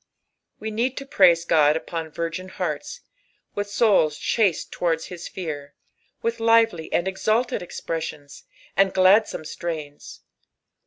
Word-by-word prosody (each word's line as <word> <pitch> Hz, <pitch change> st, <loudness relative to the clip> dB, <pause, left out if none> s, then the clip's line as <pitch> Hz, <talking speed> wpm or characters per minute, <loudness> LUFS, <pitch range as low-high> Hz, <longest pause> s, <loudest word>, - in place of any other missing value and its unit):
We 220 Hz, 0 st, -4 dB
nerd 240 Hz, +4 st, -1 dB
to 275 Hz, -, -5 dB
praise 175 Hz, -9 st, +4 dB
God 155 Hz, -2 st, +4 dB
upon 165 Hz, 0 st, -5 dB
virgin 170 Hz, +4 st, -4 dB
hearts. 180 Hz, -, -4 dB, 0.5 s
Kith 205 Hz, 0 st, -3 dB
souls 200 Hz, -8 st, +3 dB
ehaale 220 Hz, -4 st, +2 dB, 0.2 s
tatoarda 165 Hz, -2 st, -1 dB
his 175 Hz, -1 st, -7 dB
fear, 145 Hz, -6 st, -6 dB, 0.5 s
tciih 230 Hz, 0 st, 0 dB, 0.3 s
littdy 160 Hz, -3 st, -8 dB
and 175 Hz, -, +1 dB
eitaUed 215 Hz, +6 st, 0 dB
etjn^sions, 160 Hz, -4 st, -6 dB, 0.3 s
and 195 Hz, -1 st, +3 dB
gladsome 190 Hz, -2 st, +4 dB
strains. 155 Hz, -3 st, -6 dB
175 Hz, 120 wpm, -24 LUFS, 160-205 Hz, 0.5 s, praise